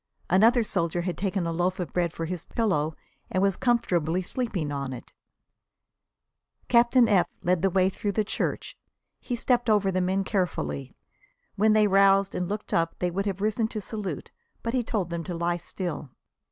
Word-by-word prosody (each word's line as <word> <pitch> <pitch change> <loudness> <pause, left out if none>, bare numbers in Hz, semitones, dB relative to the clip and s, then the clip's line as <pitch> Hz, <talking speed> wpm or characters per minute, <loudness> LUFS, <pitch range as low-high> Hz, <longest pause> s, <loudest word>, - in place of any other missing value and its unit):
Another 225 +6 +5
soldier 170 -4 -1
had 175 0 -2
taken 195 -2 -1
a 165 - -1
loaf 180 +3 0
of 175 -6 -4
bread 175 -2 +1
for 165 - -4
his 175 0 -4
pillow 160 -9 0 0.3
and 185 - 0
was 195 -2 +2
comfortably 185 - +1
asleep 225 +3 -3
on 140 -2 -3
it. 125 - -10 1.5
Captain 240 0 +5
F 195 -5 +4 0.2
led 180 -1 +2
the 195 - +3
way 185 0 +3
through 200 +1 -2
the 215 - +1
church. 210 - -3 0.4
He 245 - -3
stepped 240 -1 +1
over 205 -2 +3
the 185 0 0
men 190 +2 +1
carefully. 170 - -2 0.6
When 215 +2 +4
they 215 0 +5
roused 195 0 +4
and 180 -1 -2
looked 210 +1 -4
up 165 0 +1
they 180 -1 -1
would 195 +3 -2
have 195 -1 -3
risen 215 +1 +1
to 220 - -5
salute, 200 - -5 0.3
but 230 - -2
he 255 - +2
told 200 -7 -2
them 170 -1 -3
to 175 - -4
lie 170 +1 0
still. 175 -4 -5
190 Hz, 180 wpm, -26 LUFS, 175-215 Hz, 1.5 s, Another